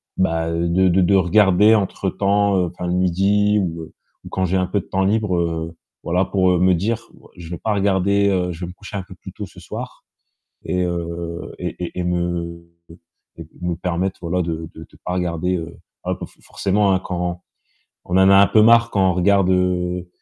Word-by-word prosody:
bah, 80 -3 0
de 85 +3 +2
de 90 +2 +3
de 100 +2 +3
regarder 95 +3 +5
entre 95 -1 -1
temps, 100 +1 +1
heu, 90 - +2
enfin 90 +1 -6
le 90 - -1
12:00 100 +3 +2
ou 85 -3 -3
heu, - - -13 0.3
ou - - -10
quand 95 - -1
j'ai 95 +2 -1
un 90 -1 0
peu 100 - 0
de - - -9
temps 95 0 -1
libre. 105 -2 +1
Heu, 85 -1 -2 0.3
voilà 90 +3 +1
pour, 95 -2 +2
heu, 90 - +2
me 90 0 +4
dire: 110 +6 -1 0.3
«Je 85 -2 -10
vais 85 - -5
pas 110 - -1
regarder, 100 0 +2
heu, 90 -2 0
je 80 - -11
vais 85 - -3
me - - -7
coucher 100 +2 -11
un 95 - -3
peu - - -12
plus - - -11
tôt - - -6
ce - - -15
soir.» - - -8 0.6
Et 90 0 -1
heu 85 -1 -4
et 90 -1 -4
et 90 - -5
et - - 0
me 85 -1 -3 0.7
et 80 - -8
me 90 -1 -2
permettre, 90 +2 -2
voilà 90 +2 -1
de 80 -1 -4
de - - -11
de - - -20
pas 90 - -3
regarder 90 0 -1
heu, 85 0 -7 0.3
ah - - -1
bah, - - -8
f - - -23
forcément, 100 0 0
hein, 95 - +3
quand 90 -1 -3 0.6
on 90 - -1
en 95 +1 +6
a 95 - +7
un 100 0 +7
peu 110 - +4
marre 115 +1 +5
quand 95 -2 +3
on - - -1
regarde 95 0 +3
heu 90 -1 0
90 Hz, 220 wpm, -20 LUFS, 85-95 Hz, 0.7 s, a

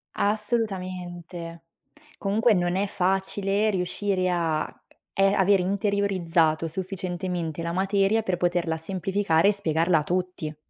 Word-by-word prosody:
Assolutamente. 185 -6 -3 0.6
Comunque 215 +3 +3
non 175 -1 +1
è 195 +2 +1
facile 195 +3 +1
riuscire 185 0 0
a 165 -3 -1 0.4
e 195 - +4
avere 195 -1 +4
interiorizzato 185 -5 +1
sufficientemente 180 -2 -4
la 170 0 -2
materia 195 +4 +2
per 185 -4 -1
poterla 175 -2 0
semplificare 190 +1 +1
e - - +5
spiegarla 165 -3 +2
a 150 - -2
tutti. 180 -3 -3
185 Hz, 110 wpm, -25 LUFS, 170-200 Hz, 0.6 s, e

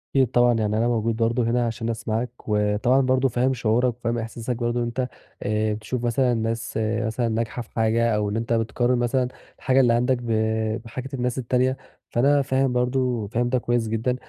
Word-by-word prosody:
أكيد 135 -2 +5
طبعًا، 120 -1 +4
يعني 110 -2 0
أنا 115 +2 +2
موجود 115 -1 0
برضه 115 +2 +1
هنا 120 +1 +1
عشان 115 0 -3
أسمَعك 115 +1 -2 0.2
وطبعًا 105 +5 +2
برضه 130 0 +2
فاهم 125 +3 +1
شعورك 120 0 +1
وفاهم 120 -1 -2
إحساسك 115 +2 -4
برضه 120 +1 -1
إن - - 0
أنت 125 +2 -2 0.4
آآ 105 +1 0
تشوف 110 +3 -4
مثلًا 125 +1 +2
ناس 115 -1 -2
مثلًا 110 +2 -1
ناجحة 115 +2 -2
في 115 - -13
حاجة 115 0 +2
أو 105 -1 0
إن 105 - -2
أنت 115 +1 -1
بتقارِن 120 +2 +1
مثلًا 125 +1 +1 0.3
الحاجة 130 0 +2
اللي 120 -3 +4
عندك 125 +2 +2
ب 120 -1 -4 0.5
بحاجة 130 +4 -6
الناس 125 -1 -1
التانية، 130 +1 +1 0.3
فأنا 140 +4 +3
فاهم 135 -1 +1
برضه، 125 -3 0
فاهم 120 +3 0
ده 130 - +2
كويس 120 -1 0
جدًا. 115 +3 0
120 Hz, 190 wpm, -24 LUFS, 115-125 Hz, 0.5 s, أكيد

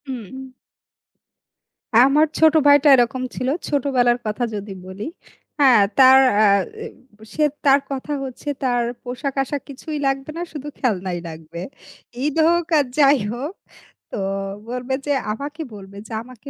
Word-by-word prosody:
উম 260 +1 -8 1.5
আমার 275 +5 +5
ছোট 315 -1 +6
ভাইটা 285 +1 +6
এরকম 255 +1 +1
ছিল। 255 - -3 0.2
ছোটবেলার 255 -4 +2
কথা 215 +3 -2
যদি 205 0 -6
বলি। 190 +2 -8 0.6
হ্যাঁ, 255 -6 +6 0.2
তার 265 0 +8 0.2
অ্যা 215 0 +5 0.3
অ্যা 260 - -12
সে 305 - 0 0.2
তার 275 0 +6
কথা 275 +2 -5
হচ্ছে 265 +2 -9 0.2
তার 245 -2 +1 0.2
পোশাক-আশাক 270 +3 -3
কিছুই 295 +3 -6
লাগবে 270 +1 -2
না, - - -4
শুধু 295 -1 -7
খেলনাই 190 -7 -1
লাগবে। 160 +1 -10 0.6
ঈদ 295 -1 -1
হোক 345 0 +2
আর 290 - +3
যাই 285 -1 +6 0.2
হোক 275 +9 -5 0.6
তো - - -5 0.5
বলবে 250 +1 -4
যে, 290 - -1 0.2
আমাকে 285 +8 -6
বলবে, 200 -1 -11
যে, - - -16
আমাকে 255 +2 -13
260 Hz, 140 wpm, -21 LUFS, 235-285 Hz, 1.5 s, তার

